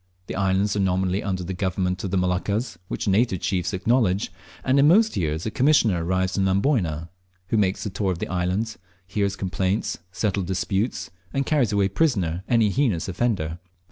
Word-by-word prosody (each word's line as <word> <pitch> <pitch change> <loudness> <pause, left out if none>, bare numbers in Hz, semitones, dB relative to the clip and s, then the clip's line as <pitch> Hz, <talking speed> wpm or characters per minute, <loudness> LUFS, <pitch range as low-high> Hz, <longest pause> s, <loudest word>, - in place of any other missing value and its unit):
The - - -5
islands 95 +1 +1
are - - 0
nominally 95 0 +1
under 95 -2 -2
the 90 +2 -4
government 90 0 -1
of 95 - -2
the 95 - 0
Moluccas, 100 +5 0
which - - -3
the 100 - +2
native 100 -2 +2
chiefs 90 -3 -1
acknowledge; 100 -1 +1 0.3
and 130 +2 +3
in 140 - +6
most 215 +7 +5
years 80 -1 -1
a 110 - -2
commissioner 130 - +3
arrives 95 +2 0
from 95 -1 +1
Amboyna, 95 - +1 0.4
who 110 - +1
makes 95 -2 +1
the 105 - -3
tour 95 0 -1
of 90 - -3
the - - -4
islands, 95 +5 -1 0.3
hears 100 +1 -1
complaints, 95 +1 -1
settle 100 +1 -1
disputes, 95 +1 -2 0.2
and 135 0 -1
carries 140 -8 +2
away 100 -2 +2
prisoner 95 - 0
any 115 -4 +3
heinous 115 - +1
offender. 95 -5 -1
95 Hz, 180 wpm, -24 LUFS, 90-110 Hz, 0.4 s, in